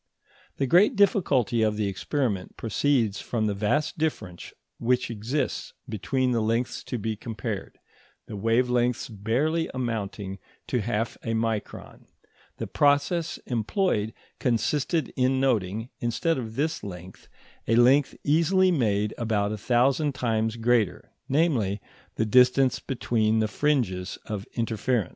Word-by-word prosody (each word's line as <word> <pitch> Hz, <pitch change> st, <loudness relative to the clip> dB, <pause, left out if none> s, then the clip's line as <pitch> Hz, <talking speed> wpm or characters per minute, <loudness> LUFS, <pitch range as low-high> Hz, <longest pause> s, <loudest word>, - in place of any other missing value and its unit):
The 140 Hz, -, +1 dB
great 185 Hz, -, +5 dB
difficulty 165 Hz, -, +3 dB
of 110 Hz, -1 st, +1 dB
the 105 Hz, -, 0 dB
experiment 100 Hz, 0 st, -2 dB
proceeds 115 Hz, -2 st, +1 dB
from 115 Hz, -3 st, -1 dB
the 105 Hz, -, 0 dB
vast 110 Hz, +11 st, 0 dB
difference 105 Hz, -, -3 dB, 0.3 s
which 125 Hz, 0 st, +1 dB
exists 115 Hz, +7 st, -2 dB
between 125 Hz, +4 st, -1 dB
the 115 Hz, -2 st, +1 dB
lengths 115 Hz, +3 st, -1 dB
to 125 Hz, -, -3 dB
be 110 Hz, 0 st, -2 dB
compared, 110 Hz, -1 st, -5 dB, 0.5 s
the 110 Hz, -, -8 dB
wave 115 Hz, +5 st, +2 dB
lengths 125 Hz, -1 st, +1 dB
barely 125 Hz, +10 st, 0 dB
amounting 105 Hz, -5 st, -3 dB, 0.3 s
to 125 Hz, -, +1 dB
half 115 Hz, +1 st, -2 dB
a 115 Hz, -, -2 dB
micron; 110 Hz, -2 st, -4 dB, 0.5 s
the -, -, -3 dB
process 145 Hz, +4 st, +1 dB
employed 115 Hz, -, 0 dB, 0.3 s
consisted 140 Hz, +5 st, 0 dB
in 130 Hz, +1 st, +2 dB
noting, 115 Hz, -3 st, 0 dB
instead 130 Hz, +6 st, 0 dB
of 110 Hz, -2 st, -6 dB
this 160 Hz, +4 st, -1 dB
length, 90 Hz, -2 st, -9 dB, 0.4 s
a 115 Hz, -, +3 dB
length 130 Hz, +4 st, +4 dB
easily 180 Hz, +5 st, +3 dB
made 105 Hz, -, +1 dB
about 105 Hz, -3 st, 0 dB
a -, -, -2 dB
thousand 130 Hz, +6 st, +2 dB
times 110 Hz, -2 st, 0 dB
greater, 115 Hz, -4 st, +1 dB, 0.2 s
namely, 130 Hz, -, +1 dB, 0.4 s
the 110 Hz, -, 0 dB
distance 125 Hz, +3 st, +4 dB
between 110 Hz, -4 st, 0 dB
the 110 Hz, -1 st, +2 dB
fringes 110 Hz, -8 st, 0 dB
of 105 Hz, -2 st, -5 dB
interference. 115 Hz, -3 st, 0 dB
120 Hz, 130 wpm, -26 LUFS, 110-135 Hz, 0.5 s, great